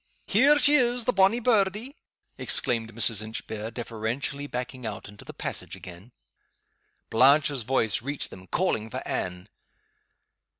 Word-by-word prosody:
Here 275 +9 +4
she 290 0 +4
is, 245 -4 +2
the 250 - +1
bonny 195 +5 +4
birdie!" 220 +2 +1 0.4
exclaimed 115 -2 +1
Mrs. 115 -1 +3
Inchbare, 110 0 -6
deferentially 120 +5 -4
backing 125 0 -6
out 105 -4 -6
into 105 0 -13
the - - -9
passage - - -6
again. 90 +6 -12 1.0
Blanche's 140 +3 +4
voice 115 -2 0
reached 140 +3 -5
them, 95 0 -12
calling 115 - -1
for - - -6
Anne. 90 0 -3
125 Hz, 130 wpm, -26 LUFS, -, 1.0 s, Here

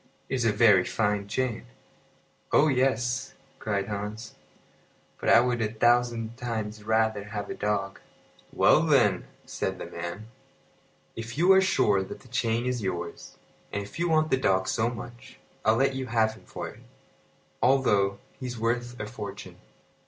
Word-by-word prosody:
"It - - -4
is 125 -3 0
a 115 - +4
very 105 -3 +5
fine 105 0 -1
chain." 120 - -2 0.8
"Oh 155 - +5
yes," 125 -2 0 0.2
cried 100 -2 -2
Hans. 105 +2 -5 0.9
"But - - -1
I 115 - +8
would 120 -1 0
a 110 -1 0
thousand 120 0 +1
times 110 -3 -4
rather 110 -1 +1
have 105 -1 -5
a - - -2
dog." 100 -2 -2 0.5
"Well, - - +5
then," - - +3 0.2
said - - -3
the - - -6
man, 90 +5 -6 0.9
"if 115 +3 -7
you 175 +4 +5
are 190 0 +7
sure 130 - +3
that 95 - -7
the 130 - -17
chain 120 -2 0
is 125 -2 -1
yours, 85 -3 -5 0.3
and 100 - -2
if 100 +9 -10
you 175 0 +1
want 155 -1 +2
the 130 - +4
dog 95 -7 +1
so 110 +1 +1
much, 120 +2 -10 0.3
I'll 110 +1 +4
let 135 +3 +2
you 130 -1 -4
have 110 -1 +2
him 110 - -17
for - - -6
it, - - -14 0.8
although 105 -7 +3 0.2
he's 125 -2 -5
worth 120 +2 -2
a 105 - -3
fortune." 105 -3 -8
115 Hz, 160 wpm, -27 LUFS, 105-125 Hz, 0.9 s, I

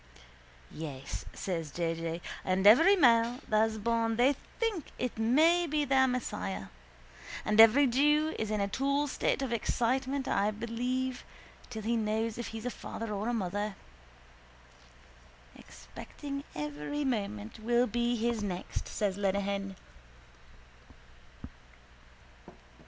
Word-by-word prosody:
—Yes, 140 -4 -6
says 165 -5 -3
J. 165 +3 -1
J., 165 +1 -4 0.2
and 190 +1 0
every 325 - +8
male 240 -6 +4
that's 220 0 +2
born 230 +1 0
they 255 +5 +3 0.2
think 440 - -1
it 250 -1 -3
may 320 +10 +4
be 300 -1 0
their 265 -1 +4
Messiah. 95 - -3 0.8
And 215 +1 +6
every 225 +6 +7
jew 295 +5 +3
is 220 - -2
in 215 -1 -1
a 200 - +1
tall 280 +6 0
state 275 0 -1
of 250 -3 -2
excitement, 260 +4 0
I 200 +1 +2
believe, 245 +4 -3 0.5
till 220 -3 -6
he 235 +2 0
knows 220 +1 -1
if 240 - -4
he's 225 +1 -7
a 250 - -1
father 225 -2 -6
or 210 +3 -2
a - - +1
mother. 205 0 -2 1.8
—Expecting 280 -1 -9
every 150 - -3
moment 200 - -3
will 240 +2 +2
be 240 +1 0
his 235 -1 -1
next, 185 -3 -4
says 200 -2 -2
Lenehan. 200 0 -1
230 Hz, 125 wpm, -31 LUFS, 200-260 Hz, 1.8 s, every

